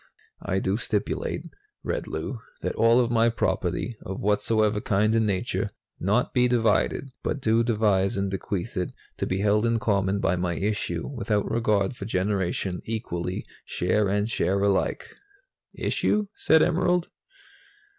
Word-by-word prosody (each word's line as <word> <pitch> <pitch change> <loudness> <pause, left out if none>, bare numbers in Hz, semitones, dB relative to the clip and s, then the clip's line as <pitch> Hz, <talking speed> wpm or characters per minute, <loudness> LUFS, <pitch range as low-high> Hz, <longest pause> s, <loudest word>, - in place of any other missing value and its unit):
"'I - - -1
do - - 0
stipulate,'" - - -2 0.4
read - - -2
Lou, - - -4 0.2
"'that - - -1
all 115 +2 +4
of 120 -1 +1
my 115 0 +4
property, 105 0 -1
of 95 0 -6
whatsoever 105 +1 +1
kind 105 +2 +2
and 110 -1 +2
nature, 100 +1 -1 0.3
not 105 +7 +1
be 125 -1 +4
divided, 120 +3 +1
but 145 - -2
do 115 -2 +3
devise 105 -4 +2
and 100 0 -1
bequeath 95 +3 -3
it 90 -2 -2 0.2
to - - -2
be 95 +1 -1
held 105 +1 +3
in 115 0 +2
common 100 -4 +1
by 90 - +1
my 90 -1 -1
issue, 95 -4 -2
without 115 -6 -1
regard 105 -2 +1
for 100 - -7
generation, 95 -2 -1
equally, 90 -6 -3 0.2
share 95 +3 0
and 105 +1 +1
share 100 -2 +1
alike.'" 100 -1 0 0.6
"Issue?" 210 0 +1
said 160 0 +4
Emerald. 180 0 +1
105 Hz, 145 wpm, -26 LUFS, 95-115 Hz, 0.6 s, all